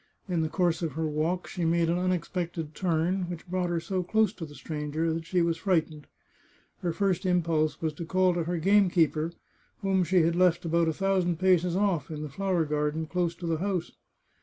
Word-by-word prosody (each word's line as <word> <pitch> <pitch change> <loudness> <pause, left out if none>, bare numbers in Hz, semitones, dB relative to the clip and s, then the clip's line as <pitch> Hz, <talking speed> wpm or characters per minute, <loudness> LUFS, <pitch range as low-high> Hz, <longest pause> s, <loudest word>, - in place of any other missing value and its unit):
In 175 -3 0
the 160 - -1
course 175 -1 +1
of 160 -5 -2
her 160 +2 -2
walk 155 +4 -1
she 180 - -4
made 165 0 +2
an 170 +2 +1
unexpected 175 -3 -2
turn, 175 +1 0
which 175 -1 -7
brought 180 0 -1
her 170 -1 0
so 185 +3 -2
close 215 +3 +2
to 165 -7 -7
the 145 - -13
stranger 155 +2 -2
that 165 0 -5
she 175 0 +2
was 165 -1 0
frightened. 160 -4 -1 0.7
Her 175 - -1
first 185 0 0
impulse 165 -4 +1
was 160 -1 0
to 165 +3 -6
call 185 +1 +2
to 170 -2 -1
her 175 +1 -1
game 195 +3 +4
keeper, 160 -1 +1 0.5
whom 190 -1 +2
she 180 -1 +3
had 165 +1 +1
left 180 -1 +3
about 165 0 +2
a 160 - +1
thousand 185 -1 +1
paces 180 -1 +3
off, 190 -5 +1
in 155 -1 -5
the 150 - -5
flower 185 +1 0
garden, 150 +1 -1
close 175 +1 -1
to 175 - -8
the 165 -1 0
house. 185 -2 -2
170 Hz, 210 wpm, -28 LUFS, 160-185 Hz, 0.7 s, game